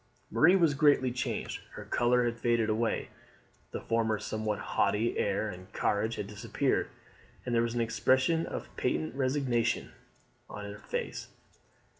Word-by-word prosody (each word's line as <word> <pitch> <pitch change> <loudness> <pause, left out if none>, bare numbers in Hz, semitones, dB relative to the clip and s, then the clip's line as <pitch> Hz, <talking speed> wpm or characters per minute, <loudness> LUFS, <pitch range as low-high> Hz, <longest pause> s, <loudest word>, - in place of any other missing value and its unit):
Marie 175 +4 +6
was 165 -6 +4
greatly 140 -3 +4
changed: 125 - -3
her - - -8
colour 120 0 +2
had 120 0 -2
faded 115 -2 +2
away, 115 +1 0 0.6
the - - -5
former 115 -1 +1
somewhat 110 0 -2
haughty 110 +4 +1
air 100 +2 0
and 90 -2 -9
carriage 110 +3 0
had - - -4
disappeared, 105 +1 -1 0.6
and 125 - -2
there 115 - +4
was 115 0 -1
an 120 - +1
expression 130 +7 +2
of - - -6
patient 80 +4 -1
resignation 130 -3 0 0.6
on 105 - -7
her 100 +1 -8
face. - - -4
115 Hz, 145 wpm, -30 LUFS, 105-130 Hz, 0.6 s, Marie